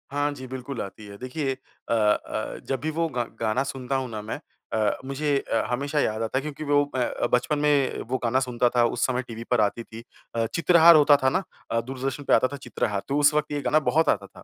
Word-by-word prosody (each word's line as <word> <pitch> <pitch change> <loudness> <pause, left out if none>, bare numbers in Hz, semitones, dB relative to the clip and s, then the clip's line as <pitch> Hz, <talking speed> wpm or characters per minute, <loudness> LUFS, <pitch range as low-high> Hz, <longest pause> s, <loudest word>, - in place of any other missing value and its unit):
हाँ 145 +1 0
जी, 130 -2 -9
बिल्कुल 130 0 -5
आती 100 +2 -8
है। 100 0 -10
देखिए 135 +3 -3
अ 130 - -8
अ, 105 -2 0
जब 135 - -1
भी 155 - -1
वो 165 +1 0
गा 125 -4 -1 0.2
गाना 115 +4 +1
सुनता 135 -1 -4
हूँ 130 -1 -2
ना 110 -2 -5
मैं 105 - -5 0.3
अ, 110 -1 +1
मुझे 140 +1 0
अ, 115 - -1
हमेशा 140 +4 -1
याद 110 -5 0
आता 115 +3 -2
है। - - +1
क्योंकि 150 +1 -6
वो 145 -1 +3
मैं 125 -1 +2
अ, - - -2
बचपन 125 +5 +2
में 145 -2 +2
वो 130 - +1
गाना 120 +2 +2
सुनता 125 -2 +1
था। 120 - +5
उस 120 0 0
समय 125 -1 0
टीवी 115 0 -7
पर 125 - +4
आती 105 +3 0
थी। 115 0 -11 0.3
अ, 115 -1 +1
चित्रहार 170 0 +7
होता 150 -1 +7
था 130 - +5
ना 185 +7 0 0.3
अ, 115 - +2
दूरदर्शन 135 +3 -4
पे - - +1
आता 130 - +5
था - - -4
चित्रहार। 105 -6 -2
तो 140 - 0
उस 145 +1 +5
वक़्त 150 0 0
ये 145 -1 -2
गाना 140 +4 +3
बहुत 160 +2 +3
आता 100 -1 +1
था। - - -16
130 Hz, 245 wpm, -25 LUFS, 115-145 Hz, 0.3 s, चित्रहार